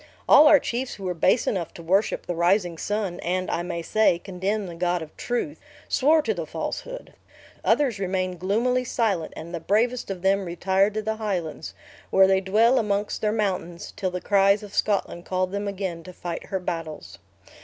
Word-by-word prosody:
All 300 +2 +8
our 300 -1 +8
chiefs 245 +2 -3
who 195 - -11
were 180 -1 -1
base 175 +7 +2
enough 180 -5 -2
to 170 - -9
worship 195 +6 +1
the 175 - -2
rising 175 +1 +2
sun, 200 0 -3
and, 185 +1 -2
I - - -1
may 175 -1 -4
say, 215 -2 +3
condemn 195 +4 -3
the 175 - -7
God 175 0 -1
of 155 - -13
truth, 245 +5 -3 0.3
swore 305 +3 +3
to 225 - 0
the 170 -5 -5
falsehood. - - -6 0.5
Others 245 -3 +2
remained 185 -2 -2
gloomily 235 +7 +1
silent; 220 -8 -1
and 170 +2 -8
the 170 - -3
bravest 225 +8 0
of 190 -2 -5
them 195 0 +2
retired 190 +4 +1
to 215 - -2
the 220 +1 -2
Highlands, 180 -8 -4 0.3
where 190 - +6
they 190 0 +3
dwell 225 +7 +3
amongst 205 -1 -1
their 210 - +1
mountains, 185 -5 -3
till 195 -2 -1
the 180 0 -4
cries 200 +1 +3
of 205 -1 -10
Scotland 200 -4 0
called 185 0 -1
them 200 +1 -3
again 190 -4 -4
to 185 - -9
fight 170 -1 -6
her 190 - -2
battles. 165 -3 -6
195 Hz, 190 wpm, -25 LUFS, 175-215 Hz, 0.5 s, All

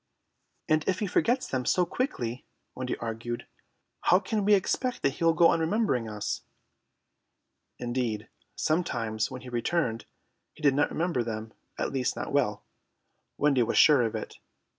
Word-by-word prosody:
"And 155 0 +3
if 185 - +2
he 210 - -1
forgets 240 +6 +1
them 130 -1 -1
so 180 +8 +2
quickly," 125 - -3 0.3
Wendy 125 0 -3
argued, 115 +1 -4 0.6
"how 180 - +6
can 210 +1 -1
we 205 +1 +6
expect 250 +6 -1
that 135 - +3
he 150 - -6
will 165 0 +4
go 165 +1 +6
on - - +2
remembering 160 - +1
us?" 105 -1 -3 1.4
Indeed, 120 -3 -2 0.3
sometimes 115 -10 0
when 130 -1 -7
he 130 - -9
returned 120 0 -1 0.5
he - - -15
did 140 -2 +5
not 145 +2 +2
remember 165 -6 0
them, 110 -1 -5 0.2
at - - -1
least 130 -2 0
not - - -5
well. 120 -8 +1 0.7
Wendy 140 -3 +3
was 115 - +1
sure 150 -4 +7
of 115 -2 0
it. - - -6
130 Hz, 160 wpm, -28 LUFS, 115-170 Hz, 1.4 s, sure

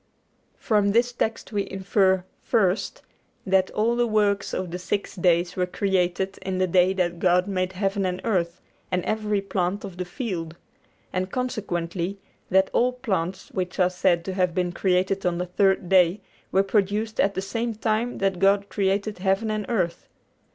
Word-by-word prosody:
From 205 -2 +2
this 240 +2 +3
text 225 -1 -2
we 205 -2 -2
infer, 190 -1 +2 0.2
first, 200 -4 0 0.4
that 190 0 +3
all 225 +3 +1
the 240 0 +2
works 205 -2 +1
of 185 -2 -3
the 180 - -4
six 200 +3 -3
days 175 -1 +2
were 180 -1 0
created 190 0 0
in 190 -1 -3
the 185 - +2
day 180 +1 +4
that 175 -2 -1
God 180 0 +3
made 185 -1 -1
heaven 195 +1 -1
and 180 0 -3
earth 180 -5 0 0.3
and 180 -1 0
every 215 -2 0
plant 195 0 -2
of 190 -3 -9
the 180 - -3
field; 175 - -4 0.6
and 185 0 -1
consequently 190 -6 -3 0.3
that 190 +1 +3
all 250 +1 +3
plants, 190 -8 -3
which 180 -1 -3
are 180 0 +4
said 180 -2 +1
to 190 - -3
have 180 -2 0
been 180 -1 0
created 190 +2 +1
on 175 -1 0
the 180 - -2
third 190 0 +2
day, 185 +1 +4 0.3
were 195 - +4
produced 210 +2 0
at 200 0 +2
the - - -1
same 230 +3 -3
time 220 +2 -1
that 195 -2 0
God 200 +1 +3
created 200 +1 -1
heaven 195 +3 +1
and 215 -2 -3
earth. 180 -8 -1
190 Hz, 170 wpm, -25 LUFS, 180-205 Hz, 0.6 s, day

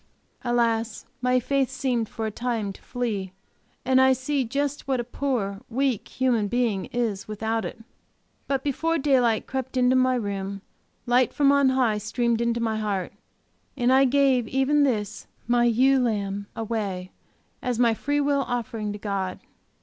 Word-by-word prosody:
Alas, 235 -2 0 0.2
my 250 0 +3
faith 270 +1 0
seemed, 250 -4 -1
for 225 - -4
a 220 - -2
time, 225 -3 -2
to - - -16
flee, 215 -7 -3 0.5
and 260 0 +4
I 265 0 +6
see 265 +2 -1
just 280 +4 -2
what 265 -2 +1
a - - -1
poor, 230 -6 -2
weak 255 -2 0
human 245 -5 +1
being 230 -4 0
is 225 -5 -2
without 220 +1 -2
it. 225 - -7 0.6
But 270 -1 -1
before 325 +4 0
daylight 255 -6 +2
crept 265 -1 -4
into 250 0 +4
my 255 0 +3
room 200 -3 -3 0.4
light 245 0 +3
from 280 -1 +4
on 280 -1 +4
high 250 -5 +2
streamed 230 +2 0
into 235 0 0
my 225 -2 0
heart, 205 -4 -2 0.6
and 245 0 +3
I 270 +1 +6
gave 265 -3 +3
even 270 +4 +2
this, 215 -4 -2 0.2
my 240 0 +3
ewe 260 +3 +4
lamb, 200 -4 -1
away, 205 -5 -3 0.5
as 250 -2 -1
my 235 -1 +4
free 290 +6 -1
will 285 -1 +2
offering 225 -3 -3
to - - -6
God. 195 -3 -3
240 Hz, 160 wpm, -25 LUFS, 215-260 Hz, 0.6 s, I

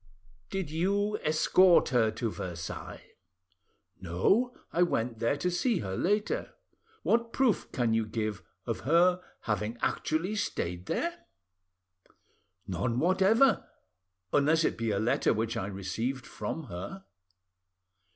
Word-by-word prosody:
"Did 190 -6 -3
you 200 +6 0
escort 170 +4 +4
her 120 -4 +3
to 110 +1 -3
Versailles?" 85 -4 -6 1.0
"No; 195 - +1 0.2
I 175 - +2
went 115 -9 0
there 115 +5 +1
to 180 +5 -1
see 220 +5 +1
her 95 -2 -4
later." 205 - 0 0.5
"What 235 0 +2
proof 255 -5 +1
can 120 -3 +1
you 110 -1 +1
give 110 -2 -3 0.2
of - - -2
her 175 +4 +3 0.2
having 105 +2 -2
actually 165 - -1
stayed 90 - -3
there?" 345 0 -3 1.4
"None 110 +6 -1
whatever, 190 - +4 0.7
unless 155 +3 +4
it - - +1
be 115 0 -2
a 100 - +1
letter 110 +2 +2
which 110 +1 -1
I 95 - -2
received 105 +7 -3
from 165 - -5
her." 130 - -7
140 Hz, 120 wpm, -30 LUFS, -, 1.4 s, escort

